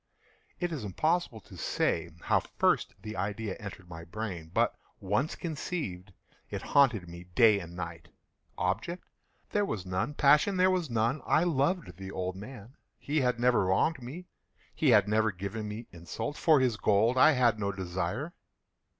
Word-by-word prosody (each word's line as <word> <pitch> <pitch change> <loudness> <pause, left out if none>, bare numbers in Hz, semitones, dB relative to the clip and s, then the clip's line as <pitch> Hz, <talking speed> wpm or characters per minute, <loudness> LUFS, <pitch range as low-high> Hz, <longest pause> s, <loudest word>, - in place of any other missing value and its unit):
It 175 -1 -1
is 150 -8 -4
impossible 155 - 0
to - - -14
say - - 0
how - - +3
first - - 0
the 110 0 -6
idea 100 +1 -3
entered 100 -4 -9
my 85 -1 -9
brain; 85 -2 -6
but - - +2 0.2
once 105 - 0
conceived, 145 - -4 0.4
it - - -5
haunted 120 -10 +3
me 85 +1 -10
day 110 -4 +6
and 85 -2 -9
night. 85 -2 -6 0.5
Object 115 - -2 0.4
there 205 - +2
was 105 - -3
none. 95 +10 -2
Passion 150 +8 +4
there 185 +1 +5
was 180 -5 0
none. 115 +5 0
I 160 - +4
loved 165 - 0
the 95 0 -7
old 95 -1 -3
man. 115 +4 -10 0.2
He 150 +1 -1
had 125 -2 +1
never 120 -5 +3
wronged 125 - +1
me. 145 +10 -8 0.5
He 155 - +2
had 105 -4 +6
never 110 +1 +2
given 100 +3 -5
me 105 +3 -6
insult. 90 - -5
For 155 -2 +4
his 125 -4 +1
gold 110 +4 +3
I 155 +5 +6
had 120 -4 +3
no 100 -1 0
desire. 95 - -3
110 Hz, 165 wpm, -30 LUFS, 95-145 Hz, 0.5 s, day